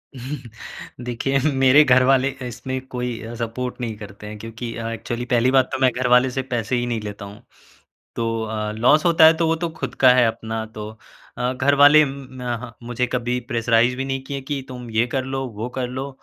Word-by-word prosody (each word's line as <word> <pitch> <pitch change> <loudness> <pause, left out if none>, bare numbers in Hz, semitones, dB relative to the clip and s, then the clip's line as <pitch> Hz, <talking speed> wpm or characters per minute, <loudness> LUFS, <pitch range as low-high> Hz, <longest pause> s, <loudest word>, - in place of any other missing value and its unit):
देखिए, 125 0 -5
मेरे 135 +2 +6
घर 130 -2 +5
वाले 135 +1 +3 0.2
इसमें 130 +2 -5
कोई 125 -2 -4
अ, 115 +1 -7
सपोर्ट 120 +2 -4
नहीं 115 -3 -3
करते 105 0 -10
हैं 105 0 -8
क्योंकि 115 +1 -7
अ, 115 -1 -4
एक्चुअली 120 +1 -4
पहली 125 0 +2
बात 130 -1 +3
तो 130 - -3
मैं 130 -1 +5
घर 125 +1 -2
वाले 125 +1 +5
से 135 - -2
पैसे 115 +1 -1
ही 120 0 0
नहीं 120 -2 -2
लेता 105 -1 -7
हूँ। 100 +3 -12 0.8
तो 115 -1 -1
अ, 110 -1 -3
लॉस 125 +8 +3
होता 165 -2 +5
है 160 - +7
तो 165 0 +1
वो 160 - +2
तो 170 +1 -2
खुद - - -4
का 130 - +9
है 125 -2 +5
अपना 115 0 -3
तो 105 -1 -6 0.5
अ, 125 +1 0
घरवाले 145 +3 +6
म 135 -1 -7
म - - -7 0.2
ह 120 - -10
मुझे 120 +1 -1
कभी 125 0 -1
प्रेशराइज़ 120 0 +2
भी 135 - -2
नहीं 135 0 -3
किए 140 0 -5
कि 135 0 -4
तुम 125 -2 -8
ये 110 +2 +2
कर 130 +1 -2
लो, 135 0 -3
वो 110 0 -6
कर 125 -1 -1
लो 130 +2 -5
125 Hz, 215 wpm, -22 LUFS, 115-135 Hz, 0.8 s, का